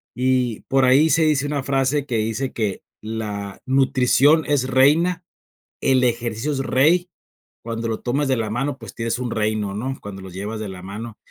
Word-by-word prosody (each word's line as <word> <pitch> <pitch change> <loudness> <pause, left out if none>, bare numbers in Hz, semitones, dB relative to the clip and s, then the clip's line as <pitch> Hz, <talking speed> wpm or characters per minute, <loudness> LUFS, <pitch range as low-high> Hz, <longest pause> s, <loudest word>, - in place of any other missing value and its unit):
Y, 125 -3 +1
por 135 -1 +4
ahí, 140 +5 +5
se 165 0 +3
dice 145 -3 +2
una 145 -2 -2
frase 135 +1 0
que 120 -5 -1
dice 115 +5 -2
que: 105 -4 -2 0.2
"La 105 -2 -5
nutrición 135 +3 +4
es 140 -3 +1
reina, 165 +7 +3 0.6
el 130 -1 +3
ejercicio 120 +2 -1
es 140 - -2
rey, 160 +7 +2 0.5
cuando 115 0 -4
lo 110 - -2
tomas 135 +4 0
de 130 - +2
la 110 -2 -2
mano, 135 +5 -2
pues, 115 -7 -11
tienes 115 +1 -2
un 125 -2 -3
reino", 105 -2 -1
¿no?, 130 +6 -3
cuando 95 -1 -8
los 95 -2 -10
llevas 105 +3 -5
de 105 - -4
la 90 -1 -9
mano. 105 +4 -8
125 Hz, 185 wpm, -22 LUFS, 110-135 Hz, 0.6 s, ahí